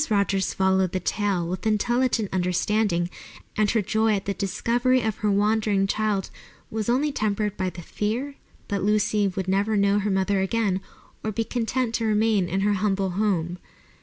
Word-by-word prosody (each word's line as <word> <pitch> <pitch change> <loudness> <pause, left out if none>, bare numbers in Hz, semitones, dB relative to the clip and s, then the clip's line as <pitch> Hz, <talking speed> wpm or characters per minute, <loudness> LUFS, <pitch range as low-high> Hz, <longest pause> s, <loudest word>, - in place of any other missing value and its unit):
Rogers 200 -2 +1
followed 190 -1 +2
the 185 - 0
tale 190 -2 -1
with 185 +5 -3
intelligent 230 0 +1
understanding, 180 0 +1 0.5
and 210 -1 +2
her 220 -1 +1
joy 220 +1 +2
at 195 - -4
the 200 - -1
discovery 240 +7 +1
of 220 -2 -2
her 210 - 0
wandering 205 0 +2
child 205 -1 -1 0.4
was 220 0 -2
only 280 +5 +2
tempered 210 -4 -1
by 185 -2 -1
the 175 -1 -10
fear 230 - -2 0.4
that 200 -1 -1
Lucy 210 0 +2
would 190 0 -3
never 200 +3 +1
know 200 0 +3
her 205 +1 -1
mother 195 0 +1
again 195 -1 0 0.4
or 220 - -1
be 225 +2 -1
content 240 +1 -1
to 230 - 0
remain 215 -3 +2
in 190 +3 0
her 205 +1 +2
humble 195 -1 0
home. 180 -3 -1
205 Hz, 170 wpm, -25 LUFS, 190-220 Hz, 0.5 s, know